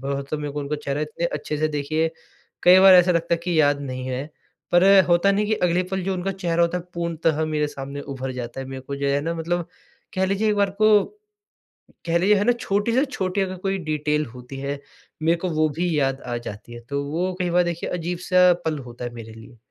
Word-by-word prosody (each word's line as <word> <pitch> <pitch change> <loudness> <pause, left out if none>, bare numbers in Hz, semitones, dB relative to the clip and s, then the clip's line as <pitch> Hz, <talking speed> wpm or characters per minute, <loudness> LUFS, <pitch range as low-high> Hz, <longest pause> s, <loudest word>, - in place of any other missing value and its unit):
बहुत 140 +1 -3
तो, 155 - -1
मेरे 145 -1 -4
को 145 - -3
उनका 145 +1 -3
चेहरा 140 +1 -2
इतने 155 +3 -2
अच्छे 150 -1 -4
से 155 +1 +1
देखिए, 155 +2 -1 0.5
कई 180 +1 +8
बार 190 0 +9
ऐसा 180 0 +6
लगता 170 0 +1
है - - -4
कि 175 -3 +2
याद 145 -1 +3
नहीं 130 -2 -5
है, 130 +1 -3 0.5
पर 175 +1 +5 0.2
होता 175 +3 +4
नहीं 210 +1 +1
कि 215 - +1
अगले 180 -3 +1
पल 190 0 -1
जो 190 0 -1
उनका 185 +2 -2
चेहरा 170 -3 0
होता 170 +1 +1
है, 175 - -9
पूर्णतः 165 -2 0
मेरे 155 -1 0
सामने 140 0 -7
उभर 135 -2 -5
जाता 125 0 -6
है। 135 - -6
मेरे 130 0 -7
को 140 +2 -6
जो 140 0 -1
है 140 +1 +1
ना, 165 +3 -2
मतलब 170 +1 -2 0.5
कह 190 -1 +1
लीजिए 200 +3 0
एक 210 - 0
बार 200 -1 +2
को, 210 +1 +4 1.0
कह 170 0 +2
लीजिए 200 +4 +4
है 200 - +1
ना, 245 - +5
छोटी 210 -2 -1
से 260 +3 +3
छोटी 195 -7 -2
अगर 185 -1 -2
कोई 195 +1 -2
डिटेल 150 0 0
होती 125 +2 -10
है, 140 +1 -4 0.4
मेरे 165 +2 +2
को 180 +2 -3
वो 155 -1 +2
भी 175 -2 0
याद 135 -1 0
आ 120 -1 -4
जाती 110 0 -9
है। 120 - -8
तो 140 0 -1
वो 175 +6 -2
कई 180 -1 0
बार 180 +1 +4
देखिए, 170 -1 -3
अजीब-सा 180 +1 +2
पल 155 -2 -1
होता 120 0 -8
है 120 - -5
मेरे 115 -1 -9
लिए। 115 +1 -14
160 Hz, 235 wpm, -23 LUFS, 140-180 Hz, 1.0 s, बार